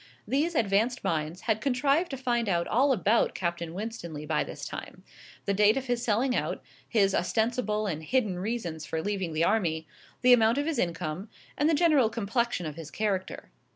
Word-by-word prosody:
These 310 +5 0
advanced 225 +2 +1
minds 160 +2 -2
had 220 -2 0
contrived 280 +6 +2
to 270 - -4
find 240 -4 0
out 170 -2 +1
all 270 +5 +3
about 225 -1 +2
Captain 170 -2 -2
Winstanley 180 -8 -5
by 155 0 +1
this - - -7
time - - -8 0.4
the 200 - +1
date 210 +4 +4
of 270 - -2
his 245 -2 -1
selling 245 +3 +1
out, - - -2 0.3
his 195 -4 +3
ostensible 220 +1 0
and 160 -6 -2
hidden 205 0 0
reasons 185 -7 -3
for 160 +1 -3
leaving 190 -1 -2
the 155 +1 0
army, 170 -6 +1 0.4
the 250 0 +8
amount 230 +1 +4
of 285 - 0
his 325 -2 -1
income, 170 +3 -2 0.3
and 295 +2 +2
the 325 - +3
general 295 -8 +4
complexion 230 -3 -1
of 155 0 -6
his 160 -2 -7
character. 195 -1 -3
215 Hz, 185 wpm, -28 LUFS, 175-245 Hz, 0.4 s, the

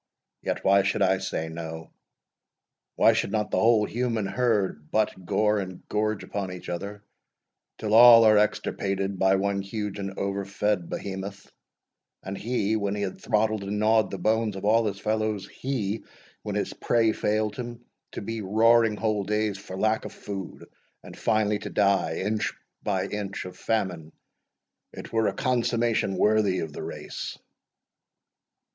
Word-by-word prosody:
Yet - - -3
why 100 +1 +6
should 100 +1 +1
I 95 0 +3
say 95 -4 -3
so? 80 -1 -7 1.0
Why - - +5
should - - -1
not 105 -1 -1
the - - +2
whole 110 -2 +4
human 115 -2 -1
herd 100 -11 0
butt, 110 -1 +1
gore, 105 0 +2
and 95 -2 -7
gorge 110 -1 0
upon 100 -2 -4
each 90 -1 -8
other, 100 +4 -5 0.7
till 110 -1 -2
all 115 0 +10
are 110 -1 +6
extirpated 100 -2 -1
but 95 0 +4
one 100 0 0
huge 100 0 -4
and 95 -1 -5
over 100 0 -2
fed 100 -2 -1
Behemoth, 95 0 -6 0.7
and 95 +1 -5
he, 110 -1 -1
when 100 -2 -1
he 100 - -2
had 95 - -5
throttled 110 -1 +1
and 100 +1 -3
gnawed 110 0 +3
the 95 - -5
bones 110 +2 +1
of 95 - -5
all 110 +1 +4
his 100 -1 -4
fellows 110 -2 -1
he, 115 -5 -3 0.4
when - - -4
his - - -1
prey 115 -2 +2
failed 105 0 0
him, 120 0 -7 0.3
to - - -5
be 115 +2 -4
roaring 110 +2 +4
whole 105 -1 0
days 105 0 -1
for 95 -2 -8
lack 110 +2 +1
of - - -7
food, 95 -3 -7 0.4
and, - - -11
finally, 105 -2 +1
to - - -6
die, 100 -5 +2
inch 105 +2 -1 0.3
by 95 -2 -1
inch, 100 -1 -4
of 90 - -8
famine 90 -8 -2 0.8
it - - -9
were 110 -1 +2
a - - 0
consummation 120 -6 +1
worthy 105 -2 +3
of 80 -2 -5
the - - -6
race!" - - -6
105 Hz, 160 wpm, -26 LUFS, 95-110 Hz, 1.0 s, all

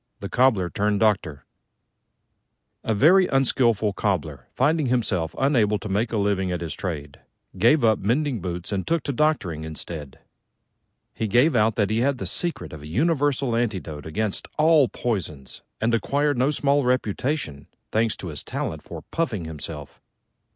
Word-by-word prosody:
THE 100 - -6
COBBLER 110 -9 +2
TURNED 105 +2 0
DOCTOR 90 - +1 1.4
A 110 - 0
very 180 - +5
unskilful 120 -6 +2
Cobbler, 75 - -2
finding 150 +2 +2
himself 110 -10 0
unable 115 -7 +2
to 110 - -7
make 105 +4 0
a 115 - -1
living 100 -2 0
at 90 - -3
his 80 -4 -4
trade, 75 -5 -5 0.4
gave 120 +9 +4
up 110 -3 +4
mending 125 +2 0
boots 90 0 -5
and 95 -2 -2
took 165 -2 +1
to 140 - -2
doctoring 120 - 0
instead. 80 -3 -7 1.0
He 110 - -2
gave 125 +8 +3
out 110 -1 +3
that 105 -2 +1
he 110 - +1
had 135 +2 +1
the - - -5
secret 160 - -2
of 75 - -8
a 75 - -9
universal 140 - +1
antidote 95 -11 -3
against 105 +5 -2
all 155 -3 +5
poisons, 80 - -4 0.2
and 115 +2 +1
acquired 145 +5 +1
no 130 +3 +3
small 145 -1 +2
reputation, 125 - -1 0.2
thanks 110 0 +1
to 90 - -6
his 75 - -6
talent 80 -2 -4
for - - -9
puffing 110 - -1
himself. 75 -2 -8
110 Hz, 160 wpm, -24 LUFS, 85-135 Hz, 1.4 s, very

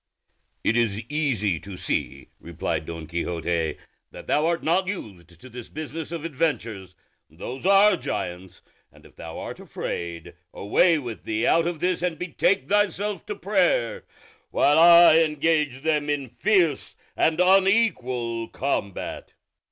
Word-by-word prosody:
"It 115 - +1
is 115 -2 0
easy 120 - 0
to 95 +1 -10
see," 70 -6 -3
replied 80 -1 -4
Don 80 -1 -6
Quixote, 85 -1 -2 0.3
"that - - -12
thou 150 +2 +1
art 170 0 -1
not 180 +4 +1
used 90 - -8
to 130 - -13
this 120 -1 -10
business 155 +1 -6
of 165 -2 -5
adventures; 115 - -3 0.3
those 125 - -6
are 200 +2 +6
giants; 90 +1 -6 0.3
and - - -20
if - - -18
thou 80 +1 -9
art - - -7
afraid, 85 0 -6 0.2
away 165 - +3
with 120 -6 -7
thee 110 0 -1
out 165 0 +3
of 170 -3 -4
this 180 -1 0
and 175 -2 -1
betake 175 -3 0
thyself 205 0 0
to 415 - -4
prayer, - - 0 0.5
while 145 +2 +3
I 170 -1 +8
engage 150 -3 0
them 150 -2 0
in 140 -3 -2
fierce 170 - +1 0.2
and 160 +1 +1
unequal 180 - +2
combat." 105 -8 -4
145 Hz, 140 wpm, -24 LUFS, -, 0.5 s, I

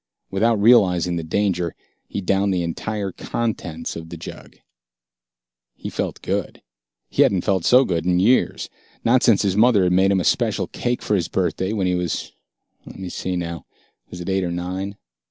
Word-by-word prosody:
Without 110 +3 +2
realizing 90 -6 +4
the 85 - -3
danger, 90 0 -1 0.3
he 100 - -4
downed 100 +1 +1
the 90 -2 0
entire 100 +4 -3
contents 90 -8 -4
of 80 0 -8
the 85 - -7
jug. - - -10 1.2
He - - -7
felt - - -4
good. - - -3 0.4
He - - 0
hadn't 95 -3 +3
felt 95 -4 0
so 130 +2 +6
good 85 -6 -1
in 90 0 +2
years, 120 +7 +2 0.4
not 125 +2 +4
since 110 -5 +4
his 95 -2 +1
mother 110 -2 +5
had 90 0 +2
made 95 +1 +4
him 100 -1 +3
a - - -1
special - - +1
cake 120 0 -3
for - - -1
his 90 -5 +1
birthday 95 +1 -1
when 100 -4 -1
he 90 - +1
was 90 -2 -2 0.5
let - - -12
me 95 -1 -6
see 90 +1 -3
now, 85 -2 -5 0.4
was 90 - -9
it 90 - -7
eight 95 0 +1
or 90 - -1
nine? 90 +3 -4
95 Hz, 185 wpm, -22 LUFS, 90-100 Hz, 1.2 s, so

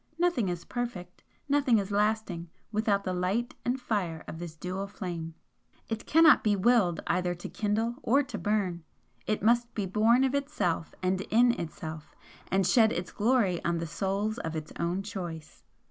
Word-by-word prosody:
Nothing 335 - +1
is 175 -1 -4
perfect, 215 -8 -5 0.3
nothing 280 -4 +3
is 200 -1 -2
lasting 205 -5 0 0.2
without 210 -2 +1
the 185 - -2
light 190 +7 -1
and 250 +2 0
fire 195 -10 -2
of 160 - -7
this 170 -2 -7
dual 185 +4 -4
flame. 175 -5 -6 0.5
It 225 -1 -4
cannot 325 -2 +6
be 210 -2 +3
WILLED 200 -4 +3
either 180 0 0
to 175 - -7
kindle 220 +3 -1
or 275 +4 +3
to 265 - -6
burn; 195 -5 -1 0.4
it 215 - -1
must 235 +2 +3
be 205 - -1
born 220 +6 +4
of 265 0 +1
itself 225 - -1
and 185 +1 +1
IN 240 +3 +5
itself, 160 -6 -6 0.3
and 190 +1 +1
shed 220 +3 +5
its 175 0 -3
glory 210 -6 +2
on 170 0 0
the 165 - -3
souls 195 +7 -2
of 160 0 -4
its 155 -1 -6
own 175 +3 -1
choice. 175 -6 -7
200 Hz, 170 wpm, -29 LUFS, 175-235 Hz, 0.5 s, cannot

